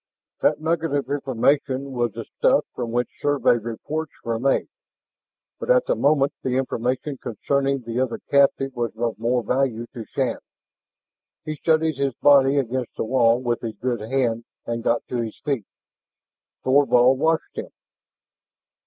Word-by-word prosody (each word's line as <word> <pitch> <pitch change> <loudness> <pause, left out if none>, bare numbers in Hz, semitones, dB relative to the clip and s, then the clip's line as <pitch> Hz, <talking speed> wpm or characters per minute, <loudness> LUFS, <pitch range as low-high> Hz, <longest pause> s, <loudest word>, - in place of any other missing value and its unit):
That - - +3
nugget 160 -1 0
of 140 - -2
information 140 0 0
was 120 -4 -1
the - - -6
stuff - - +4
from 120 -2 -4
which 120 +1 0
Survey 145 -4 +3
reports 140 +7 -5
were 115 -1 -2
made. 135 +2 +1 0.9
But - - -6
at - - +5
the - - +2
moment 140 -1 +2
the 130 -1 -1
information 130 +2 -2
concerning 135 +4 -1
the 115 +1 -3
other 130 -2 0
captive 135 -1 +2
was 120 -2 -3
of 115 -1 -2
more 120 +1 +1
value 125 -1 0
to 115 - -6
Shann. - - -2 1.1
He 155 - -3
steadied 160 -1 +1
his 135 -3 0
body 140 -1 +5
against 130 -2 -2
the - - -1
wall 120 0 +3
with 120 -1 -1
his 115 -2 -5
good 125 -2 -1
hand 115 -1 -1 0.2
and 115 0 -3
got 115 0 +1
to 125 - -2
his 115 -2 -3
feet. 135 -9 -1 1.0
Thorvald 130 -1 +4
watched 160 +2 0
him. - - -6
130 Hz, 155 wpm, -23 LUFS, 120-140 Hz, 1.1 s, at